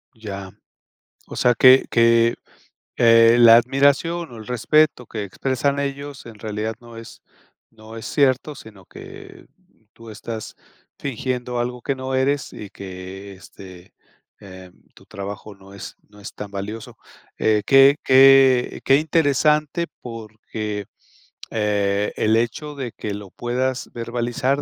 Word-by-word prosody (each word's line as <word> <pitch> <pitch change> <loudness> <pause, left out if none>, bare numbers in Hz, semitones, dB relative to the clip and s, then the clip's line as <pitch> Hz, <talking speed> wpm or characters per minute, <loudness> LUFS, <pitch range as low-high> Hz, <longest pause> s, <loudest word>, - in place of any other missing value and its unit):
Ya. 100 -4 -8 0.8
O - - -10
sea 125 0 +3
que 130 +2 +6
que, 115 0 +3 0.6
eh, 115 0 +6
la 115 -1 +8
admiración 140 +6 +1
o - - -10
el 110 - -10
respeto 125 +2 +1
que 110 -2 -6
expresan 135 +7 -2
ellos, 140 -1 -5
en 115 -2 -11
realidad 110 +1 -4
no 120 -1 -13
es 115 - -12 0.5
no 110 0 -14
es 110 - -8
cierto, 140 +1 +1
sino 105 -6 -14
que 390 -1 -13 0.5
tú 115 -1 -14
estás 110 +1 -8 0.4
fingiendo 125 -2 -4
algo 125 0 -4
que 140 - -2
no 130 0 -4
eres, 140 +1 0
y 105 - -9
que 95 +1 -10
este, 95 -1 -14 0.5
eh, 95 -2 -13 0.2
tu - - -20
trabajo 100 +1 -8
no 100 0 -17
es 100 - -9
no 105 0 -18
es 100 - -10
tan 105 -1 -8
valioso. 100 +3 -7 0.4
Eh, 105 -1 +2
qué 135 +1 +6
qué 135 -1 +5
qué 135 +1 +4
interesante, 150 +1 +1 0.2
porque, 110 -3 -7 0.7
eh, 105 -1 0
el 110 +1 +2
hecho 135 +6 -3
de 130 -5 -5
que 105 - -5
lo 100 -1 -8
puedas 125 +3 -3
verbalizar, 120 +4 -2
115 Hz, 135 wpm, -21 LUFS, 105-135 Hz, 0.8 s, la